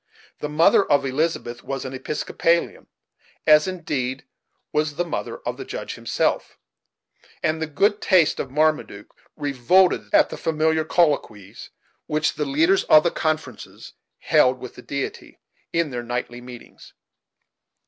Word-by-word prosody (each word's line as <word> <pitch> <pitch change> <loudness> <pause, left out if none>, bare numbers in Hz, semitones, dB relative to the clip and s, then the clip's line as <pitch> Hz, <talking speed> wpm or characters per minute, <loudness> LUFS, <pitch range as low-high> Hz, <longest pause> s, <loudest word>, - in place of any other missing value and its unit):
The 150 - -4
mother 165 +7 +4
of 145 -6 +2
Elizabeth 135 -3 -2
was 135 0 -5
an 130 - -6
Episcopalian, 165 +5 -1 0.6
as 150 +1 +6
indeed, 135 -8 -3 0.5
was 150 -1 0
the 175 - -1
mother 170 - -4
of - - -3
the - - -6
Judge - - -6
himself; - - -2 0.9
and 155 +1 0
the 160 - -1
good 200 +8 +1
taste 180 -5 +3
of 135 - -3
Marmaduke 150 -8 -1 0.2
revolted 145 +7 +2
at 310 -2 +4
the - - -6
familiar 160 0 0
colloquies 140 - -1 0.4
which 155 +1 0
the - - -3
leaders 335 +7 +2
of 155 0 +6
the 170 - +1
conferences 155 -7 -4 0.2
held 130 0 +3
with 125 -1 -9
the - - -12
Deity, 140 +1 -6 0.3
in 165 -3 0
their 120 -1 -4
nightly 120 0 -5
meetings. 125 -1 -13
150 Hz, 140 wpm, -23 LUFS, 130-165 Hz, 0.9 s, as